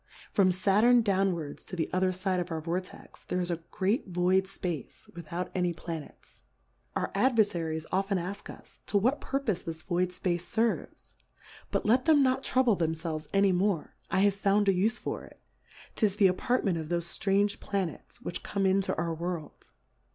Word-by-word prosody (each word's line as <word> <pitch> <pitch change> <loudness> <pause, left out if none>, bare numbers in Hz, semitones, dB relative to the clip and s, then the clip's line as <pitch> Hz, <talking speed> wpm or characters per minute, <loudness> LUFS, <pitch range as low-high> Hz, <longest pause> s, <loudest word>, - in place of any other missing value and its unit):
From 190 -2 +4
Saturn 210 +6 +4
downwards 185 -7 0
to - - -7
the 165 - -1
otherfide 185 0 +1
of 175 0 -3
our 165 -1 -2
Vortex, 175 +3 -6
there 180 - -1
is 175 -1 -1
a 170 - 0
great 205 +6 0
void 185 +1 +2
Space 180 -6 -5
without 170 +1 -5
any 180 -2 +1
Planets. 165 -2 -8 0.5
Our - - -1
Adverfaries 195 -9 +1
often 195 +1 +1
ask 190 +4 -5
us, - - -13
to 205 - +2
what 250 +8 +2
purpofe 265 -9 -1
this 160 -1 -5
void 180 0 0
Space 175 -1 -2
ferves? 230 0 -1 0.6
But - - -1
let 245 +4 +3
them 305 -3 +6
not 260 0 +2
trouble 255 -4 +3
themfelves 160 -2 -2
any 195 0 +4
more, 185 -2 0 0.2
I 190 - +2
have 200 0 +4
found 200 +1 +2
a 195 - +5
ufe 215 +6 +1
for - - -4
it. - - -15 0.6
'Tis 210 -4 +1
the 205 -2 +4
Apartment 190 -1 +2
of 160 - -5
thofe 170 0 -1
ftrange 200 0 +2
Planets, 190 -6 -4
which 175 - -5
come 200 -1 -1
into 190 0 +2
our 170 -1 -1
World. 170 -1 -5
185 Hz, 170 wpm, -29 LUFS, 175-205 Hz, 0.6 s, them